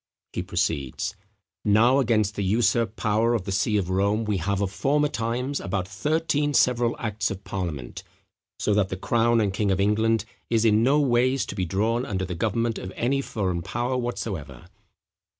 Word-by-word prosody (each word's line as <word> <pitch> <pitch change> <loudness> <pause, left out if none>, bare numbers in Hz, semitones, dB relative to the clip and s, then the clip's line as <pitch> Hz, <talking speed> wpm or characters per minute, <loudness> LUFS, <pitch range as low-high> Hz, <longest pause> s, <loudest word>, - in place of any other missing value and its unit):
He - - -2
proceeds: 80 -2 -2 0.5
"Now, 115 +6 +4
against 110 -5 +2
the 100 - -3
usurped 115 +2 +1
power 110 +3 +1
of 110 - -1
the 100 - -5
see 105 +2 +1
of 95 -2 -1
Rome, 100 +4 +1
we 105 -2 0
have 95 +3 -1
of 100 -2 -1
former 145 +7 +1
times 125 +4 -2
about 95 -2 -3
thirteen 145 - 0
several 120 -1 +3
acts 105 -1 -2
of 100 -2 -6
parliament, 85 -12 -5 0.6
so 105 - 0
that 100 -2 +2
the 95 - -4
crown 115 +3 +2
and 100 -3 +1
king 100 +1 0
of 95 0 +1
England 110 +2 +2 0.2
is 115 -1 +2
no 115 +7 +4
ways 130 -1 +2
to - - -6
be 95 -2 -2
drawn 110 +7 0
under 95 -7 -2
the 90 - -4
government 115 +5 -1
of 95 - -7
any 135 +4 0
foreign 95 -9 -2
power 120 +8 -2
whatsoever." 95 - -4
110 Hz, 175 wpm, -25 LUFS, 95-120 Hz, 0.6 s, Now